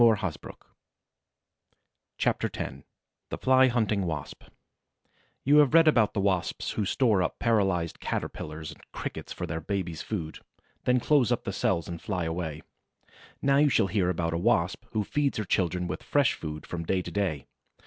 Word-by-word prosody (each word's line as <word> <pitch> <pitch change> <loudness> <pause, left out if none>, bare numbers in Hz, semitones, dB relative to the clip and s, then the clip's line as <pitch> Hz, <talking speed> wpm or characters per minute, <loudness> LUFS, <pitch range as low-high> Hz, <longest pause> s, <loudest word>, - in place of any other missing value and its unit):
CHAPTER - - +1
X - - -4 0.5
THE - - -4
FLY 130 0 +5
HUNTING 110 -6 +1
WASP 75 -4 -5 1.0
You 145 +3 +5
have 150 0 +5
read 165 -1 +7
about 115 -9 +4
the - - +1
Wasps 95 -3 0
who 105 - -1
store 110 -3 +2
up 90 - -1
paralyzed 95 -8 +1
Caterpillars 75 0 -4
and - - -15
Crickets - - -6
for - - -4
their 80 -1 -4
babies' 85 -3 -3
food, 85 -8 -5 0.5
then 125 0 +4
close 135 -2 +3
up - - 0
the - - -4
cells 85 -2 0
and 85 -1 -6
fly 90 -5 -2
away; 80 -2 -4 0.8
now 140 0 +4
you 145 +1 +5
shall 115 -5 +3
hear 95 -1 +1
about 85 -2 -1
a 85 - 0
Wasp 90 +1 +1
who 110 -2 +1
feeds 145 +6 0
her 110 - -2
children 90 -1 0
with 90 - -4
fresh 145 -4 +2
food 75 -1 -6
from 85 -1 -5
day 90 +2 0
to - - -7
day. 90 -9 -1
95 Hz, 165 wpm, -28 LUFS, 85-115 Hz, 1.0 s, read